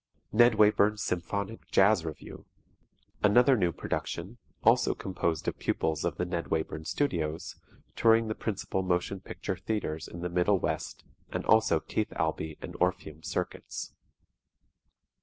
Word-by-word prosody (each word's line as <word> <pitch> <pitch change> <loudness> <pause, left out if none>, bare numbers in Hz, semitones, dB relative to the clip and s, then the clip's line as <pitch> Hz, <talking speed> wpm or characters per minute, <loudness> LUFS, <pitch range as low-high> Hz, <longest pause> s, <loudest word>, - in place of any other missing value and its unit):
"NED 120 +1 +6
WAYBURN'S 105 0 +4
SYMPHONIC 100 +5 -3
JAZZ 95 -3 +4
REVUE" 80 -2 -8 0.8
Another 120 +6 +5
new 90 -6 +2
production, 95 +7 -4 0.2
also - - +4
composed 85 -4 -2
of - - -2
pupils 80 -2 -1
of - - -1
the 90 - 0
Ned 85 -1 -3
Wayburn 80 -1 -2
Studios 85 - -1 0.4
touring 115 0 +4
the 110 - -1
principal 100 -3 -2
motion 90 +1 -1
picture 95 0 -5
theatres 90 -5 -3
in 85 - -8
the 90 - -1
Middle 90 +3 +3
West - - -3 0.3
and - - -4
also 110 -7 +4
Keith - - -2
Albee 80 -1 -2
and - - -7
Orpheum 85 -4 -1
Circuits. 80 - -4
90 Hz, 135 wpm, -29 LUFS, 85-105 Hz, 0.8 s, NED